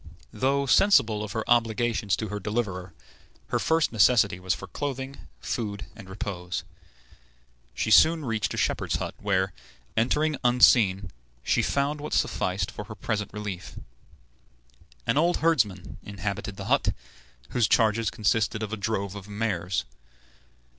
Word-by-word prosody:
Though 135 +5 +1
sensible 120 - +4
of 105 - -6
her 110 - -3
obligations 115 -3 +2
to 110 +2 -4
her 105 +1 -4
deliverer, 95 -3 -3 0.6
her - - 0
first 160 0 +2
necessity 105 -4 +4
was 95 +1 0
for - - -8
clothing, 135 -1 -5
food, 105 -4 -4
and 95 - -12
repose. 90 -2 -4 1.1
She 110 - -1
soon 160 +7 +6
reached 115 -3 -1
a - - -7
shepherd's - - 0
hut, - - -3
where, 95 -2 0 0.4
entering 150 +6 +1
unseen, 110 -6 +4 0.3
she - - +2
found 145 +1 0
what 150 - -5
sufficed 90 0 0
for 105 - -7
her 110 +1 -9
present 105 0 -3
relief. 105 -3 -6 1.3
An 120 - +1
old 175 +2 +2
herdsman 115 - 0
inhabited 100 +1 -5
the - - -6
hut, - - +1 0.5
whose 120 -3 +2
charges 110 0 +3
consisted 110 0 0
of 110 0 -4
a - - -2
drove 100 -2 -2
of 100 -1 -9
mares. 100 -5 -2
110 Hz, 140 wpm, -26 LUFS, 100-120 Hz, 1.3 s, soon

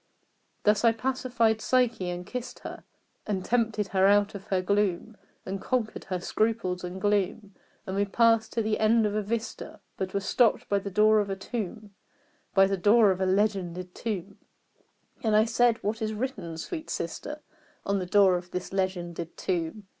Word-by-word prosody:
Thus 210 +1 +3
I 230 -1 +5
pacified 235 -2 0
Psyche 240 -8 +1
and 175 0 -5
kissed 250 +4 -6
her, - - -8 0.4
And 195 -3 -2
tempted 225 -4 0
her 190 0 +3
out 205 0 +4
of 200 -1 -8
her 190 - 0
gloom 200 +2 0 0.3
And 195 +1 -4
conquered 240 -4 -2
her 185 -2 -3
scruples 200 -2 -1
and 180 +1 -5
gloom; 205 0 0 0.3
And 190 - -4
we 200 +1 +2
passed 225 +2 +3
to 230 - 0
the 215 0 0
end 220 +1 +4
of 210 - 0
a 215 - 0
vista, 225 +3 -4 0.2
But 190 0 -4
were - - +3
stopped 220 +4 +2
by 200 - +2
the 200 - -5
door 215 +2 +4
of 205 -1 -1
a 195 - -1
tomb 210 0 -6 0.6
By 195 -1 +7
the 195 0 0
door 210 +2 +5
of 185 0 -2
a 190 - +2
legended 185 -3 0
tomb; 200 -4 -5 0.8
And 220 -2 +2
I 215 +1 +5
said 230 0 +3
"What 220 +3 -2
is 220 0 -1
written, 215 -8 -4
sweet 315 - -6
sister, 295 - -5 0.4
On 200 0 +1
the 180 - -4
door 190 -1 +5
of 175 0 -9
this 180 +1 -5
legended 175 -3 -3
tomb?" 180 +3 -2
205 Hz, 180 wpm, -27 LUFS, 190-225 Hz, 0.8 s, By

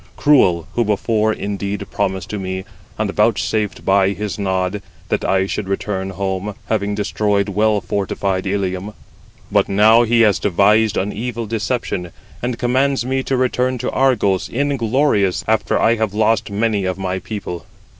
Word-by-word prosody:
Cruel, 90 - +3
who 120 - +2
before 110 +1 +1
indeed 100 -1 -3
promised 95 -1 -2
to 105 - -3
me, 95 0 -4 0.3
and 105 -2 -1
vouchsafed 105 0 0
by 95 0 +3
his 105 0 -4
nod, 95 0 -1 0.3
that - - 0
I 95 0 +2
should 100 0 -4
return 95 -1 -2
home, 95 +1 -3
having 105 -2 -1
destroyed 105 -1 0
well 105 +1 +2
fortified 95 -1 -2
Ilium. 95 +1 -2 0.6
But - - +2
now 110 +4 +5
he 120 0 +3
has 105 -4 +4
devised 105 +3 +3
an 100 +2 -1
evil 115 +1 -4
deception, 110 -5 -2 0.3
and 120 -1 -2
commands 130 +1 +1
me 130 +1 0
to 130 0 -1
return 130 0 +1
to - - -3
Argos, 105 -8 +1
inglorious, 130 -6 +1
after 110 0 +1
I 115 +1 +3
have 110 -2 -1
lost 110 0 +2
many 105 -1 0
of 95 0 -2
my 95 -1 -2
people. 95 -3 -6
105 Hz, 155 wpm, -19 LUFS, 95-115 Hz, 0.6 s, now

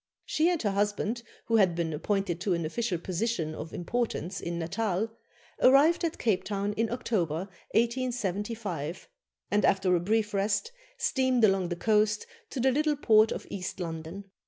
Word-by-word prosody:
She 320 +3 +2
and 350 -2 +1
her 205 - +1
husband, 205 +3 0 0.2
who 230 - +3
had 185 -5 +4
been 165 -2 -1
appointed 180 +1 -1
to 185 -2 +1
an 170 -1 -2
official 195 +3 -1
position 175 -1 -2
of 160 +1 -7
importance 190 -2 -2
in 170 0 -3
Natal, 200 +5 -1 0.5
arrived 290 +7 +6
at 335 -1 -1
Cape 220 -6 +1
Town 205 0 -2
in 225 +1 -1
October, 185 -8 -1 0.3
1875, 215 - -1 0.4
and, 205 0 +2
after 190 -2 +3
a - - +2
brief 210 +3 0
rest, 200 - 0 0.3
steamed 260 -3 +1
along 195 -4 +3
the 175 - -2
coast 215 +2 +2 0.2
to 270 - -5
the 260 +2 +3
little 300 +3 +2
port 220 -5 +5
of - - -4
East 185 -1 -5
London. 165 +2 -5
205 Hz, 160 wpm, -29 LUFS, 175-230 Hz, 0.5 s, arrived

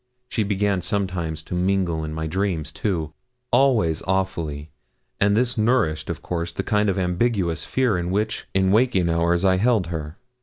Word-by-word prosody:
She 115 - -1
began 100 -2 0
sometimes 85 -5 -2
to - - -8
mingle 90 -3 0
in 80 - -4
my 80 +1 -3
dreams, 85 -3 -1
too 85 -5 -2 0.4
always 110 - +3
awfully; 85 -6 -2 0.5
and 100 +1 +3
this 120 -1 +1
nourished, 110 -9 +1
of - - -4
course, 85 -1 -3
the - - -4
kind 105 0 +1
of 95 - 0
ambiguous 90 -2 0
fear 125 -8 +1
in 85 0 -3
which, 105 +3 -1
in 95 0 +3
waking 105 -6 +3
hours, 85 +2 +2
I 95 -1 +4
held 110 -2 +2
her. 75 0 -5
95 Hz, 165 wpm, -23 LUFS, 85-105 Hz, 0.5 s, I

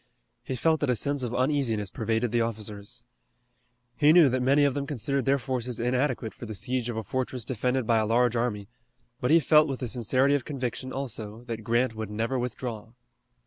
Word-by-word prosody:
He 130 - -4
felt 160 +4 +2
that 145 - 0
a 125 - +3
sense 140 +5 -1
of 120 -1 -3
uneasiness 125 -7 0
pervaded 115 +1 -1
the 120 0 +2
officers. 110 +1 -5 0.9
He 150 0 +5
knew 165 -4 +7
that 130 0 0
many 140 +3 +4
of 140 - +2
them 140 0 -3
considered 140 0 -1
their 140 +1 +3
forces 125 -3 -3
inadequate 125 -1 0
for 120 - -9
the 110 - -6
siege 125 +3 -2
of 115 - -4
a 110 - -2
fortress 125 +2 -3
defended 125 +1 -1
by 115 0 +3
a 110 - 0
large 120 +1 +2
army, 110 -4 -1 0.5
but 125 - -1
he 165 - +7
felt 155 +1 +5
with 135 -2 -4
the 125 - -3
sincerity 130 +4 +2
of 145 -3 +1
conviction 130 -2 -4
also, 115 -4 -5
that 115 -2 -6
Grant 120 +2 +1
would 110 -2 -5
never 115 +5 -1
withdraw. 120 -2 -5
125 Hz, 200 wpm, -27 LUFS, 115-135 Hz, 0.9 s, knew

